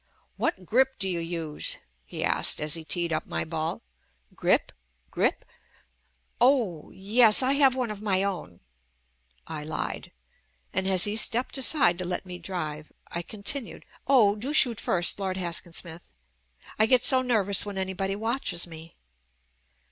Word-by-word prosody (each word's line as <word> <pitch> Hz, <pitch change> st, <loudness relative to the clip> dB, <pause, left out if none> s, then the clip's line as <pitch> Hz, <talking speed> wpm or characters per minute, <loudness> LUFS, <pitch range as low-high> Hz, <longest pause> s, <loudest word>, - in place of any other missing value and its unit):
"What 185 Hz, -, -2 dB
grip 265 Hz, +6 st, +1 dB
do 195 Hz, -, -3 dB
you 175 Hz, -2 st, -1 dB
use," 165 Hz, -2 st, -1 dB, 0.3 s
he -, -, -6 dB
asked -, -, +2 dB
as 150 Hz, 0 st, +1 dB
he 165 Hz, -1 st, -4 dB
teed 170 Hz, +1 st, -2 dB
up 155 Hz, -, -3 dB
my -, -, -3 dB
ball. 160 Hz, -, -4 dB, 0.5 s
"Grip? -, -, +1 dB, 0.4 s
Grip?" -, -, -1 dB, 0.5 s
— 60 Hz, -1 st, -42 dB
"Oh! 200 Hz, -, -3 dB
yes, 215 Hz, +4 st, +4 dB
I 260 Hz, -, +2 dB
have 275 Hz, -2 st, +4 dB
one 250 Hz, -4 st, -2 dB
of 210 Hz, -1 st, -8 dB
my 195 Hz, -3 st, +1 dB
own," 175 Hz, -, -5 dB, 0.8 s
I 155 Hz, -2 st, -5 dB
lied; 155 Hz, +1 st, -5 dB, 0.6 s
and 190 Hz, -, -1 dB
as 185 Hz, -2 st, +3 dB
he 205 Hz, 0 st, +1 dB
stepped 230 Hz, +3 st, 0 dB
aside 255 Hz, -, +5 dB
to -, -, -3 dB
let 180 Hz, +1 st, -4 dB
me 180 Hz, -1 st, -9 dB
drive, 155 Hz, -4 st, -6 dB, 0.2 s
I 170 Hz, -, -4 dB
continued, 215 Hz, -, -2 dB, 0.2 s
"Oh, 225 Hz, -7 st, +4 dB
do 250 Hz, +8 st, -4 dB
shoot 240 Hz, -7 st, +5 dB
first 175 Hz, 0 st, +1 dB
Lord 190 Hz, -1 st, -3 dB
Haskin 170 Hz, -1 st, -3 dB
Smith 170 Hz, -, -8 dB, 0.3 s
— 60 Hz, -, -22 dB
I 215 Hz, -, +4 dB
get 250 Hz, +1 st, +4 dB
so 260 Hz, -1 st, +6 dB
nervous 210 Hz, -6 st, +3 dB
when 205 Hz, -1 st, -7 dB
anybody 190 Hz, +1 st, -3 dB
watches 225 Hz, -4 st, -1 dB
me." 165 Hz, -1 st, -13 dB
190 Hz, 160 wpm, -26 LUFS, 170-220 Hz, 0.8 s, so